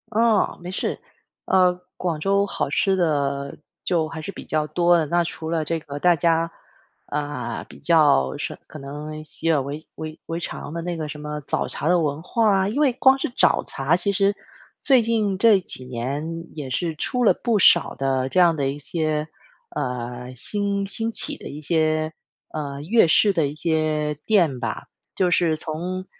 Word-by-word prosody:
嗯， 225 Hz, -2 st, +3 dB
没 175 Hz, +1 st, -6 dB
事。 190 Hz, -, -2 dB, 0.5 s
呃， 180 Hz, -1 st, +3 dB, 0.2 s
广 170 Hz, -4 st, -2 dB
州 200 Hz, +4 st, +2 dB
好 165 Hz, -, -2 dB
吃 190 Hz, +6 st, +2 dB
的 140 Hz, -5 st, 0 dB, 0.3 s
就 165 Hz, -3 st, +1 dB
还 160 Hz, 0 st, -7 dB
是 175 Hz, -, -5 dB
比 -, -, -10 dB
较 155 Hz, -1 st, 0 dB
多 175 Hz, +1 st, +3 dB
的， 160 Hz, -, +1 dB
那 175 Hz, +3 st, +2 dB
除 160 Hz, -1 st, -6 dB
了 160 Hz, -2 st, 0 dB
这 165 Hz, +2 st, -1 dB
个 145 Hz, -2 st, -7 dB
大 175 Hz, +2 st, +4 dB
家， 165 Hz, +1 st, +2 dB, 0.6 s
嗯， 145 Hz, -5 st, -4 dB
比 -, -, -14 dB
较， 145 Hz, -, +3 dB
什 -, -, -4 dB
可 155 Hz, -, -10 dB
能 150 Hz, +2 st, -7 dB
习以为- 155 Hz, -2 st, -1 dB
为 155 Hz, 0 st, -7 dB
为 165 Hz, +1 st, -3 dB
常 155 Hz, -3 st, -6 dB
的 170 Hz, -, -3 dB
那 175 Hz, +1 st, -3 dB
个 155 Hz, -2 st, -4 dB
什 150 Hz, -, -6 dB
么 150 Hz, 0 st, -5 dB
早 -, -, -2 dB
茶 155 Hz, -, -2 dB
的 180 Hz, 0 st, +4 dB
文 150 Hz, -1 st, -1 dB
化 220 Hz, +5 st, +1 dB
啊。 190 Hz, +1 st, +1 dB
因 240 Hz, +7 st, -2 dB
为 285 Hz, -4 st, +4 dB
光 265 Hz, +2 st, +4 dB
是 -, -, -1 dB
早 -, -, +4 dB
茶， 140 Hz, +6 st, 0 dB
其 200 Hz, +3 st, +1 dB
实 200 Hz, +1 st, +2 dB, 0.5 s
最 265 Hz, -4 st, +5 dB
近 215 Hz, -4 st, 0 dB
这 210 Hz, 0 st, +6 dB
几 150 Hz, -7 st, -5 dB
年 140 Hz, +7 st, -4 dB
也 145 Hz, -4 st, -5 dB
是 160 Hz, +5 st, -2 dB
出 250 Hz, +10 st, -1 dB
了 -, -, +6 dB
不 230 Hz, -3 st, 0 dB
少 170 Hz, -2 st, +5 dB
的 135 Hz, -1 st, 0 dB
这 185 Hz, -, +1 dB
样 170 Hz, -2 st, +5 dB
的 140 Hz, -3 st, 0 dB
一 140 Hz, +2 st, -5 dB
些， 155 Hz, 0 st, -1 dB, 0.5 s
呃， 125 Hz, -2 st, -4 dB
兴 200 Hz, -, -1 dB
兴 225 Hz, +3 st, -1 dB
起 -, -, +1 dB
的 -, -, -9 dB
一 145 Hz, -, -7 dB
些， 155 Hz, 0 st, +1 dB, 0.4 s
嗯， 140 Hz, -2 st, -4 dB
粤 225 Hz, +1 st, +5 dB
式 205 Hz, +5 st, +5 dB
的 165 Hz, -5 st, +2 dB
一 140 Hz, -, -5 dB
些 155 Hz, -1 st, 0 dB
店 170 Hz, -, +3 dB
吧。 115 Hz, -3 st, -4 dB, 0.3 s
就 180 Hz, -2 st, +2 dB
是 165 Hz, -2 st, +2 dB
从 180 Hz, +5 st, -4 dB
160 Hz, 205 characters per minute, -23 LUFS, 145-185 Hz, 0.6 s, 这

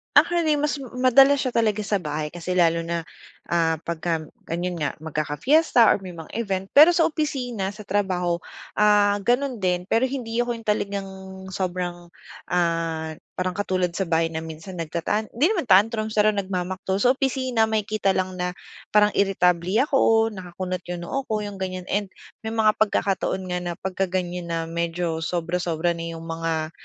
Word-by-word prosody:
Actually, 335 Hz, -3 st, +4 dB
mas 295 Hz, -1 st, 0 dB, 0.2 s
madalas 270 Hz, +3 st, +5 dB
siya 255 Hz, -, 0 dB
talaga 215 Hz, -3 st, +1 dB
sa 205 Hz, 0 st, 0 dB
bahay 150 Hz, -3 st, -3 dB
kasi 175 Hz, +2 st, -4 dB
lalo 170 Hz, -2 st, +3 dB
na, 170 Hz, 0 st, -2 dB, 0.5 s
ah, 165 Hz, -2 st, +1 dB
'pagka 165 Hz, -1 st, -2 dB, 0.2 s
gano'n 175 Hz, +1 st, -3 dB
nga 150 Hz, -3 st, -1 dB
magkaka-fiesta 160 Hz, -, +3 dB
or -, -, +4 dB
may 180 Hz, -, -7 dB
mga 165 Hz, -1 st, -10 dB
event. 195 Hz, -4 st, -2 dB
Pero 310 Hz, +5 st, +8 dB
sa 330 Hz, -1 st, +3 dB
opisina, 245 Hz, -, -2 dB
sa 210 Hz, -, -10 dB
trabaho, 185 Hz, -4 st, 0 dB, 0.4 s
ah, 205 Hz, -1 st, +4 dB
gano'n 250 Hz, 0 st, +1 dB
din, 180 Hz, -1 st, -1 dB
pero 235 Hz, +3 st, +3 dB
hindi 245 Hz, -4 st, -4 dB
ako 240 Hz, 0 st, +1 dB
yung 230 Hz, -2 st, -10 dB
talagang 200 Hz, -2 st, -1 dB, 0.4 s
sobrang, 175 Hz, -2 st, -4 dB, 0.3 s
ah, 165 Hz, -2 st, -1 dB, 0.2 s
parang 185 Hz, +1 st, -2 dB
katulad 185 Hz, -3 st, 0 dB
sa 190 Hz, -, 0 dB
bahay 165 Hz, 0 st, +1 dB
na 160 Hz, 0 st, -5 dB
minsan 160 Hz, +3 st, -8 dB
nagtatan 170 Hz, +6 st, -1 dB
hindi 290 Hz, -, +3 dB
naman 360 Hz, -, 0 dB
tantrums, 215 Hz, +2 st, +3 dB
pero 215 Hz, 0 st, +4 dB
nagmamaktol. 190 Hz, -1 st, -2 dB
Sa 255 Hz, +2 st, +4 dB
opisina, 260 Hz, -4 st, +1 dB
makikita 215 Hz, -2 st, 0 dB
lang 185 Hz, 0 st, -2 dB
na 180 Hz, 0 st, -2 dB, 0.4 s
parang 210 Hz, 0 st, +6 dB
iritable 185 Hz, 0 st, +2 dB
ako, 225 Hz, -6 st, +3 dB
nakakunot 185 Hz, -2 st, -5 dB
yung 175 Hz, -, -6 dB
noo 270 Hz, +10 st, -3 dB
ko, 215 Hz, -1 st, -1 dB
yung 205 Hz, -1 st, -6 dB
ganyan, 185 Hz, -1 st, -5 dB
and 205 Hz, +1 st, 0 dB, 0.4 s
may 220 Hz, -, -3 dB
mga 215 Hz, -1 st, +3 dB
pagkakataon 195 Hz, -2 st, +1 dB
nga 180 Hz, -, -1 dB
na 175 Hz, -1 st, -3 dB
pagkaganyan 185 Hz, -2 st, -2 dB
na 165 Hz, -1 st, -2 dB
medyo 170 Hz, 0 st, -2 dB
sobra-sobra 170 Hz, -1 st, -1 dB
na 165 Hz, 0 st, -5 dB
yung 165 Hz, -, -8 dB
mga, 165 Hz, -1 st, -2 dB
190 Hz, 165 wpm, -24 LUFS, 170-220 Hz, 0.5 s, Pero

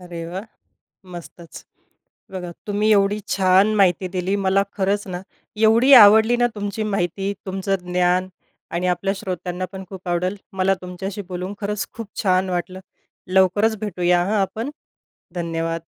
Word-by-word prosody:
अरे 175 Hz, -2 st, -7 dB
वाह! 185 Hz, +4 st, -6 dB, 0.7 s
मस्तचं. 170 Hz, -1 st, -11 dB, 0.7 s
बघा, 180 Hz, -2 st, -5 dB, 0.2 s
तुम्ही 210 Hz, +1 st, +1 dB
एवढी 205 Hz, 0 st, +2 dB
छान 195 Hz, +2 st, +3 dB
माहिती 185 Hz, -2 st, +3 dB
दिली 185 Hz, +1 st, -2 dB
मला 195 Hz, +1 st, +3 dB
खरंच 200 Hz, +1 st, 0 dB
ना, 180 Hz, -1 st, -4 dB, 0.4 s
एवढी 225 Hz, +5 st, +4 dB
आवडली 220 Hz, +1 st, +8 dB
ना, 240 Hz, -, +3 dB
तुमची 205 Hz, +1 st, -4 dB
माहिती 195 Hz, -1 st, -1 dB
तुमचं 195 Hz, +1 st, -1 dB
ज्ञान 180 Hz, +1 st, +1 dB, 0.4 s
आणि 175 Hz, +2 st, -2 dB
आपल्या 180 Hz, +2 st, 0 dB
श्रोत्यांना 185 Hz, -1 st, -4 dB
पण 190 Hz, 0 st, -7 dB
खूप 190 Hz, -2 st, -9 dB
आवडल. 180 Hz, +3 st, -1 dB, 0.2 s
मला 195 Hz, 0 st, +2 dB
तुमच्याशी 190 Hz, +3 st, -6 dB
बोलून 185 Hz, +2 st, -5 dB
खरंच 205 Hz, 0 st, -2 dB
खूप 230 Hz, -3 st, -7 dB
छान 185 Hz, -1 st, +2 dB
वाटलं. 185 Hz, +1 st, -3 dB, 0.5 s
लवकरच 205 Hz, +4 st, +3 dB
भेटूया 180 Hz, -4 st, +1 dB
हं, 205 Hz, -, -1 dB
आपण, 220 Hz, +7 st, -2 dB, 0.6 s
धन्यवाद. 165 Hz, -1 st, -3 dB
190 Hz, 140 wpm, -21 LUFS, 180-205 Hz, 0.7 s, आवडली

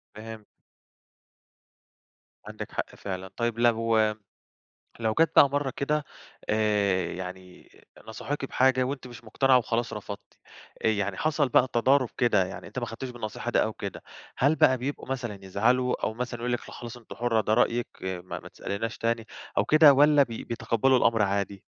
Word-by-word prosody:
فهمت. 110 Hz, 0 st, -9 dB, 2.0 s
عندِك -, -, -7 dB
حق -, -, -4 dB
فعلًا. 95 Hz, -1 st, -6 dB
طيب 115 Hz, -1 st, -1 dB
لو 115 Hz, -1 st, +3 dB, 1.0 s
لو 110 Hz, -1 st, 0 dB
جات 165 Hz, -1 st, +4 dB
بقى 140 Hz, -, +8 dB
مَرّة 140 Hz, -1 st, -1 dB
كده 150 Hz, +2 st, 0 dB, 0.5 s
آآ 105 Hz, -4 st, +1 dB
يعني 90 Hz, 0 st, -9 dB, 0.4 s
نصحوكي 135 Hz, +5 st, -4 dB
بحاجة 130 Hz, 0 st, +3 dB
وأنتِ 130 Hz, 0 st, -4 dB
مش 120 Hz, -1 st, -12 dB
مقتنعة 130 Hz, +4 st, +3 dB
وخلاص 120 Hz, -1 st, -1 dB
رفضتِ 100 Hz, -1 st, -8 dB, 0.5 s
آآ -, -, +5 dB
يعني 100 Hz, -3 st, 0 dB
حصل 150 Hz, -3 st, +1 dB
بقى 130 Hz, -, +4 dB
تضارب 130 Hz, +1 st, +3 dB
كده، 105 Hz, -6 st, +3 dB
يعني -, -, -8 dB
أنتِ -, -, -5 dB
ما -, -, -3 dB
خدتيش 120 Hz, +3 st, -6 dB
بالنصيحة 115 Hz, -4 st, -5 dB
دي -, -, +3 dB
أو -, -, -3 dB
كده -, -, -7 dB, 0.3 s
هل 140 Hz, +4 st, +3 dB
بقى 130 Hz, -4 st, +4 dB
بيبقوا 130 Hz, +1 st, -5 dB
مثلًا 120 Hz, -6 st, -4 dB
يزعلوا 125 Hz, +6 st, +1 dB
أو 110 Hz, -, 0 dB
مثلًا 120 Hz, 0 st, -5 dB
يقُولوا 120 Hz, +1 st, 0 dB
لِك -, -, -16 dB
لأ -, -, -11 dB
خلاص 120 Hz, 0 st, -8 dB
أنتِ 115 Hz, -, -11 dB
حُرّة 115 Hz, -2 st, +1 dB
ده 105 Hz, -, 0 dB
رأيِك 120 Hz, 0 st, +2 dB
ما 90 Hz, -1 st, -5 dB
ما -, -, -12 dB
تسأليناش 110 Hz, +3 st, -4 dB
تاني 115 Hz, -1 st, -1 dB, 0.3 s
أو -, -, +3 dB
كده 155 Hz, -2 st, +7 dB
والّا 145 Hz, +1 st, +6 dB
بي 115 Hz, -4 st, -7 dB
بيتقبلوا 115 Hz, +2 st, +1 dB
الأمر 115 Hz, -2 st, +3 dB
عادي؟ 100 Hz, -1 st, -1 dB
115 Hz, 165 wpm, -27 LUFS, 105-130 Hz, 2.0 s, بقى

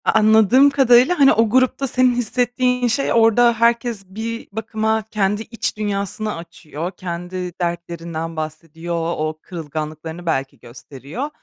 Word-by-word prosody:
A -, -, +4 dB
anladığım 220 Hz, +5 st, +5 dB
kadarıyla, 270 Hz, +4 st, +4 dB
hani, 275 Hz, -1 st, +7 dB
o 225 Hz, 0 st, +2 dB
grupta 260 Hz, +3 st, +2 dB
senin 255 Hz, -1 st, +3 dB
hissettiğin 250 Hz, +1 st, 0 dB
şey, 275 Hz, +4 st, 0 dB
orada 230 Hz, +1 st, +5 dB
herkes 230 Hz, -2 st, 0 dB
bir 225 Hz, +4 st, -6 dB
bakıma 220 Hz, +1 st, -1 dB
kendi 205 Hz, 0 st, 0 dB
iç 225 Hz, -1 st, -4 dB
dünyasını 205 Hz, 0 st, -3 dB
açıyor, 165 Hz, 0 st, -7 dB
kendi 180 Hz, 0 st, -6 dB
dertlerinden 170 Hz, -1 st, -4 dB
bahsediyor, 165 Hz, +2 st, -5 dB, 0.2 s
o 155 Hz, 0 st, -3 dB
kırılganlıklarını 160 Hz, 0 st, -6 dB
belki 135 Hz, -5 st, -2 dB
gösteriyor. 140 Hz, -, -8 dB
210 Hz, 125 wpm, -20 LUFS, 170-235 Hz, 0.2 s, hani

